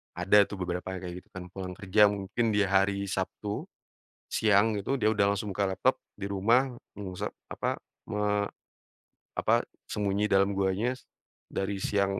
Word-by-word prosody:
Ada 95 Hz, +3 st, +5 dB
tuh 100 Hz, -, -6 dB
beberapa 90 Hz, +1 st, -3 dB
yang 90 Hz, -, -6 dB
kayak 90 Hz, -1 st, -5 dB
gitu, -, -, -31 dB
kan. 95 Hz, -, -6 dB
Pulang 95 Hz, -1 st, -5 dB
kerja 105 Hz, +1 st, +5 dB
mungkin 100 Hz, +3 st, -1 dB
di 105 Hz, -, +4 dB
hari 100 Hz, +1 st, +2 dB
Sabtu, 100 Hz, +2 st, -3 dB, 0.6 s
siang 105 Hz, 0 st, +3 dB
gitu, 135 Hz, +8 st, -1 dB
dia 110 Hz, -4 st, +3 dB
udah 100 Hz, -2 st, +3 dB
langsung 105 Hz, +1 st, -3 dB
buka 100 Hz, 0 st, +1 dB
laptop 95 Hz, -, +2 dB, 0.2 s
di 100 Hz, -, -4 dB
rumah 120 Hz, +7 st, +3 dB, 0.3 s
mengusa 95 Hz, -3 st, -4 dB, 0.2 s
apa, -, -, -1 dB, 0.3 s
me 105 Hz, -1 st, +1 dB, 0.9 s
apa, -, -, +2 dB, 0.3 s
sembunyi 105 Hz, 0 st, 0 dB
dalam 100 Hz, 0 st, +4 dB
guanya, 100 Hz, +5 st, +1 dB, 0.6 s
dari 95 Hz, 0 st, -2 dB
siang 100 Hz, -1 st, +1 dB
100 Hz, 155 wpm, -29 LUFS, 95-105 Hz, 0.9 s, Ada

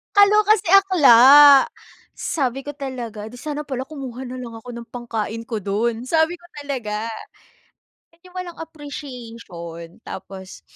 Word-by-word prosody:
Kaloka 415 Hz, +1 st, +5 dB
si -, -, -8 dB
akla. 290 Hz, -7 st, +7 dB, 0.5 s
Sabi 270 Hz, -4 st, -2 dB
ko 290 Hz, +1 st, -8 dB
talaga, 235 Hz, -6 st, -7 dB
"Di 245 Hz, -, -11 dB
sana 300 Hz, -1 st, -5 dB
pala 265 Hz, -1 st, -5 dB
kumuha 265 Hz, -4 st, -7 dB
nalang 245 Hz, -3 st, -8 dB
ako 245 Hz, -, -16 dB
ng 235 Hz, -, -8 dB
pangkain 230 Hz, -2 st, -4 dB
ko 225 Hz, -, -3 dB
dun," 225 Hz, +4 st, -2 dB
sabi 320 Hz, +5 st, +1 dB
ko 345 Hz, -, -25 dB, 0.2 s
talaga. 230 Hz, -6 st, -4 dB, 1.1 s
'Yung 365 Hz, 0 st, -16 dB
walang 355 Hz, -2 st, -6 dB
appreciation. 235 Hz, -, -9 dB
Tapos 190 Hz, 0 st, -9 dB
255 Hz, 130 wpm, -21 LUFS, 225-300 Hz, 1.1 s, akla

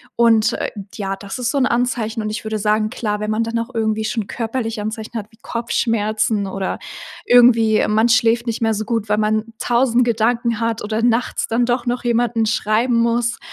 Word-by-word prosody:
und, 230 Hz, -1 st, +4 dB
äh, -, -, -2 dB, 0.3 s
ja, 195 Hz, -2 st, -3 dB
das 200 Hz, +3 st, -7 dB
ist 245 Hz, -1 st, 0 dB
so 285 Hz, -, -1 dB
'n 260 Hz, -, +3 dB
Anzeichen. 235 Hz, -2 st, -1 dB
Und 215 Hz, -, -2 dB
ich 215 Hz, +1 st, -5 dB
würde 220 Hz, 0 st, -2 dB
sagen 215 Hz, +1 st, +1 dB
klar, 210 Hz, -2 st, -3 dB
wenn 215 Hz, +1 st, -2 dB
man 225 Hz, +1 st, +1 dB
dann 230 Hz, 0 st, -2 dB
auch 230 Hz, +3 st, -5 dB
irgendwie 220 Hz, -1 st, -1 dB
schon 215 Hz, -3 st, -2 dB
körperliche 225 Hz, -2 st, -3 dB
Anzeichen 220 Hz, +2 st, -5 dB
hat 210 Hz, -, -9 dB
wie 220 Hz, -, -22 dB
Kopfschmerzen 220 Hz, -3 st, -1 dB
oder 190 Hz, 0 st, -3 dB, 0.5 s
irgendwie, 230 Hz, -3 st, +5 dB
ähm, -, -, +1 dB
man 220 Hz, +2 st, +4 dB
schläft 230 Hz, +1 st, +3 dB
nicht 230 Hz, 0 st, -2 dB
mehr 225 Hz, -1 st, +2 dB
so 215 Hz, +1 st, -3 dB
gut, 220 Hz, -2 st, -2 dB
weil 210 Hz, -, +2 dB
man 215 Hz, +1 st, +1 dB
1.000 245 Hz, 0 st, +2 dB
Gedanken 235 Hz, 0 st, 0 dB
hat 230 Hz, -1 st, -1 dB
oder 215 Hz, +2 st, -2 dB
nachts 240 Hz, +1 st, +1 dB
dann 235 Hz, +2 st, +1 dB
doch 245 Hz, 0 st, -1 dB
noch 245 Hz, 0 st, -2 dB
jemanden 235 Hz, -1 st, +1 dB
schreiben 220 Hz, +3 st, +1 dB
muss 235 Hz, +1 st, +1 dB
225 Hz, 205 wpm, -19 LUFS, 215-235 Hz, 0.5 s, irgendwie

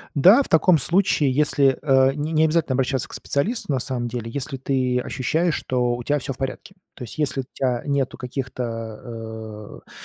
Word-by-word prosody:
Да, 190 Hz, -, +7 dB
в -, -, -9 dB
таком 165 Hz, +2 st, +5 dB
случае, 155 Hz, 0 st, +2 dB
если, 140 Hz, -1 st, +3 dB
э, 135 Hz, -2 st, +4 dB
не 150 Hz, +2 st, -3 dB
необязательно 155 Hz, -3 st, +2 dB
обращаться 130 Hz, 0 st, 0 dB
к -, -, -10 dB
специалисту, 185 Hz, -, -1 dB
на 135 Hz, -, +1 dB
самом 120 Hz, -2 st, -3 dB
деле, 115 Hz, -1 st, -5 dB
если 135 Hz, +2 st, -4 dB
ты 130 Hz, -1 st, 0 dB
ощущаешь, 160 Hz, +7 st, 0 dB
что 125 Hz, -1 st, 0 dB
у 120 Hz, -, -6 dB
тя 145 Hz, +3 st, +1 dB
всё 135 Hz, 0 st, -5 dB
в -, -, -18 dB
порядке. 135 Hz, +8 st, -5 dB, 0.2 s
То 125 Hz, -, -8 dB
есть, 115 Hz, -, -9 dB
если 145 Hz, -3 st, 0 dB
у -, -, -6 dB
тя 125 Hz, -3 st, -1 dB
нету 140 Hz, -2 st, -1 dB
каких-то, 115 Hz, -4 st, -6 dB
э, -, -, -25 dB
135 Hz, 185 wpm, -23 LUFS, 125-150 Hz, 0.2 s, Да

